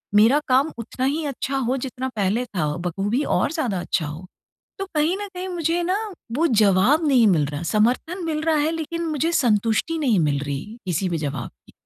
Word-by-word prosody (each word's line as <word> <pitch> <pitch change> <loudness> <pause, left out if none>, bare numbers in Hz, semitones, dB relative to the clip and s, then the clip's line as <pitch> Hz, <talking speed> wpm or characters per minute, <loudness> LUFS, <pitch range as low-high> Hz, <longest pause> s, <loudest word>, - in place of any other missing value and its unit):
मेरा 225 +8 +6
काम 270 +4 +3
उतना 245 +3 -4
ही 300 +3 0
अच्छा 275 -1 -2
हो 260 0 0
जितना 260 0 -4
पहले 210 +4 0
था 180 -9 -2
बख़ूबी 195 - -1
और - - +1
ज़्यादा 250 - -1
अच्छा 175 -2 -1
हो। 155 +5 -7 0.5
तो 390 - -2
कहीं 305 +4 +2
न 410 - -5
कहीं, 365 +1 -4
मुझे 340 0 0
ना 365 +2 +1 0.4
वो 325 +5 +3
जवाब 220 - +4
नहीं 250 -6 +5
मिल 165 -7 +3
रहा। 145 +3 -5
समर्थन 245 - 0
मिल 310 -2 -1
रहा 320 0 +2
है 300 +2 +2
लेकिन 330 +1 -3
मुझे 315 +2 0
संतुष्टि 230 +4 +1
नहीं 250 - +2
मिल 145 -3 +1
रही 140 -1 -4 0.2
किसी 180 +1 -1
भी 170 - -1
जवाब 145 -2 -4 0.2
की। - - -17
255 Hz, 195 wpm, -23 LUFS, 190-315 Hz, 0.5 s, मेरा